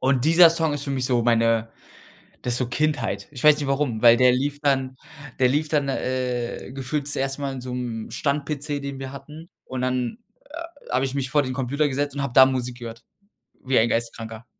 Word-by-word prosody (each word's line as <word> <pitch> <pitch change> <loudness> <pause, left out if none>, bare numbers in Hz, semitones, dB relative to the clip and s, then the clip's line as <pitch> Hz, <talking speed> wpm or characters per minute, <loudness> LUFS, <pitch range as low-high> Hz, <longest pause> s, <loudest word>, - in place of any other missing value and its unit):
Und 130 -1 +1
dieser 165 +2 +7
Song 160 -2 0
ist 145 -1 -5
für 140 - -4
mich 130 -2 -1
so 125 -2 +1
meine 115 -1 +2 0.7
das 120 -1 0
so 125 - 0
Kindheit. 120 -8 -1
Ich 140 -1 -8
weiß 150 -1 +8
nicht 145 - -3
warum, 135 -5 -1
weil 120 -1 +8
der 125 0 +5
lief 140 +3 -1
dann 135 -2 +1 0.4
der 125 - +4
lief 150 +4 0
dann, 145 -2 0
äh, 125 -2 -3
gefühlt 140 +2 -3
zuerst 135 -1 -2
mal 140 -1 -3
in 130 - -6
so 125 0 -7
'm 120 -3 -4
Stand-PC, 145 0 -2
den 140 -1 -5
wir 135 0 -6
hatten 150 +4 -11 0.2
und 130 -1 -5
dann, 125 - -1 0.3
äh, 335 -1 -10
habe 130 +1 +2
ich 135 0 -3
mich 135 -2 -2
vor 145 0 +3
den 130 - -4
Computer 140 +3 0
gesetzt 140 +1 -2
und 140 - -1
habe 140 -3 -3
da 130 - +9
Musik 125 -2 -3
gehört 115 -1 -9 0.6
wie 130 0 +2
ein 115 - +3
Geisteskranker. 115 0 -4
130 Hz, 210 wpm, -24 LUFS, 125-145 Hz, 0.7 s, da